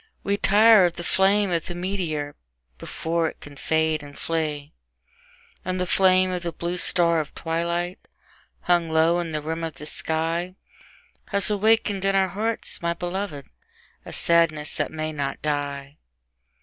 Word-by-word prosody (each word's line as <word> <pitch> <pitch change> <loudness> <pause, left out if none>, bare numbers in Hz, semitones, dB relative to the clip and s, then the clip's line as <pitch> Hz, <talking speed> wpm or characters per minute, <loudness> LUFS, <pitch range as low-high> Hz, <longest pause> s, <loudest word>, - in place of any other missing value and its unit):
We 200 - +1
tire 210 0 +6
of 175 -1 -1
the 175 - -6
flame 195 +2 +3
of 165 -2 -1
the 175 - -5
meteor, 175 -6 -3 0.5
before 165 0 -2
it - - -14
can 145 -1 -12
fade 160 +1 0
and 145 -1 -12
flee; 150 -3 -3 0.9
And 185 0 -3
the 180 - 0
flame 185 0 +3
of 180 -1 -3
the 170 -1 -3
blue 170 +2 -4
star 170 -2 +3
of 150 - -5
twilight, 170 +2 -2 0.6
hung 175 -2 +2
low 160 +2 +3
on 170 -2 -3
the 150 -1 -3
rim 160 +2 -3
of 160 -3 -4
the 150 - -10
sky, 165 +4 -2 0.7
Has 200 +1 0
awakened 210 -1 +2
in 195 0 +1
our 190 -1 +3
hearts, 220 +4 -2
my 170 0 -1
beloved, 175 -5 -4 0.6
a - - -10
sadness 165 -3 +2
that - - -1
may 155 0 -4
not 140 -2 -3
die. 145 -1 -3
170 Hz, 160 wpm, -24 LUFS, 155-185 Hz, 0.9 s, tire